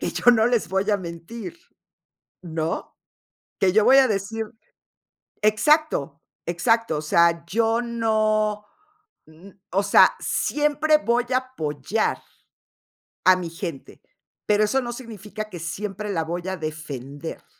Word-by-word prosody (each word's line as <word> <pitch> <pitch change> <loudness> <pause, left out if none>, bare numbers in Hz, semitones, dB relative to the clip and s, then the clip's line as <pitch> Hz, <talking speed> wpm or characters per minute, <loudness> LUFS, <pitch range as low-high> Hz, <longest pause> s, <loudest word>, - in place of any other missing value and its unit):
que - - -2
yo 245 - +5
no 225 -1 +4
les 240 -2 +1
voy 190 +2 0
a 205 - +3
mentir, 190 - -8 0.8
¿no? 160 -2 -4 0.6
Que 185 -2 +3
yo 215 +1 +4
voy 265 - +7
a 260 -2 +6
decir 215 +2 -2 1.0
exacto, 215 - +2 0.2
exacto, 225 0 +1
o - - -3
sea, 170 +2 +3
yo 225 +5 +1
no, 215 -3 0 0.6
mm, 160 +5 -15 0.2
o 195 +2 +1
sea, 200 - +6
siempre 300 +1 +1
voy 240 -3 0
a - - +4
apoyar 215 - -2 1.0
a 185 0 +7
mi 175 -2 -4
gente, 165 -5 -7 0.4
pero 210 0 +3
eso 265 +6 +1
no 240 -1 -5
significa 215 -3 -8
que 175 -4 -8
siempre 200 +5 -4
la 165 -4 0
voy 175 +3 -5
a 190 0 -3
defender. 150 -2 -7
210 Hz, 135 wpm, -23 LUFS, 170-230 Hz, 1.0 s, voy